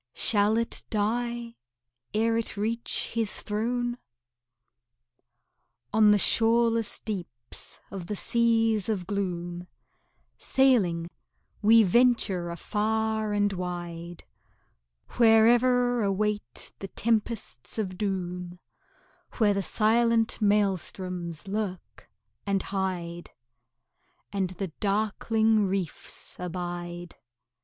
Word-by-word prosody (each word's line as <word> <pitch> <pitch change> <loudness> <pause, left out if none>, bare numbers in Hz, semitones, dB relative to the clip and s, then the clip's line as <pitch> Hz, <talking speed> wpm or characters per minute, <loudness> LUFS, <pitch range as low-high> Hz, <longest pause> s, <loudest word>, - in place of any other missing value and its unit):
Shall 210 0 +2
it 230 0 -1
die 235 +2 -2 0.5
ere 225 +2 +1
it 230 -2 -2
reach 230 +3 0
His 225 -2 -2
throne? 240 +3 -2 1.9
On 215 -1 +6
the 210 - +6
shoreless 230 +1 +3
deeps 170 - -7
of 185 -3 -6
the 210 - -3
seas 225 -1 +2
of 195 -5 -1
gloom 175 -3 -3 0.7
Sailing, 185 -11 +2 0.5
we 225 +2 +7
venture 205 -4 +2
afar 220 +4 -1
and 205 -1 +1
wide, 175 -2 -6 0.9
Where 225 -2 +6
ever 245 0 +3
await 210 +1 -2
the 195 - -5
tempests 220 - -2
of 190 -4 -2
doom, 180 -3 -3 0.8
Where 210 -3 +3
the 200 - 0
silent 225 +3 +2
maelstroms 185 -4 -1
lurk 195 -2 -5 0.4
and 195 -1 +1
hide, 180 -3 -3 1.0
And 195 -2 0
the 185 +1 -5
darkling 215 +1 +2
reefs 185 -4 -4
abide. 175 -1 -5
205 Hz, 90 wpm, -27 LUFS, 180-225 Hz, 1.9 s, we